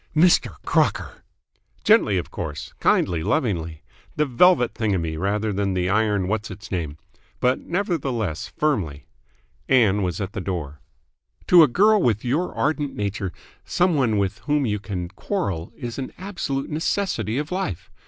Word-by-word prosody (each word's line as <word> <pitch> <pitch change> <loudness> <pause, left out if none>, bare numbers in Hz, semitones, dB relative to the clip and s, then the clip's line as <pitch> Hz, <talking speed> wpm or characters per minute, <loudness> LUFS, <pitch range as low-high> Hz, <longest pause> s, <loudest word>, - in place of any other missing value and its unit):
"Mr. 170 +3 +4
Crocker!" - - 0 0.6
"Gently, 210 - +4
of 90 - -4
course. 75 -4 -6
Kindly 85 -3 +2
lovingly. 85 - -1 0.3
The 150 - +2
velvet 140 0 +4
thingummy 95 -8 -1
rather 105 +5 -1
than 100 -1 -1
the 90 0 0
iron 105 -3 +1
what's 110 +1 -2
its 100 +2 -10
name. 80 -6 -3 0.4
But 125 +1 +2
nevertheless 135 - -2
firmly." 85 - -1 0.6
Ann 105 -6 +4
was 90 0 -2
at 100 -1 -4
the 100 - -4
door. 80 -6 -4 0.7
"To 175 -2 +9
a 155 - +7
girl 205 - +4
with 110 - +1
your 150 +9 0
ardent 150 -2 -1
nature 100 -2 -2 0.3
some 180 0 +1
one 125 -8 +2
with 100 0 -1
whom 145 -2 +2
you 105 -3 -1
can 95 -4 -4
quarrel 95 - -3
is 120 +1 -6
an 130 - -4
absolute 165 -9 -4
necessity 160 - -1
of 150 +3 -3
life. 180 - -3
110 Hz, 150 wpm, -23 LUFS, 95-150 Hz, 0.7 s, To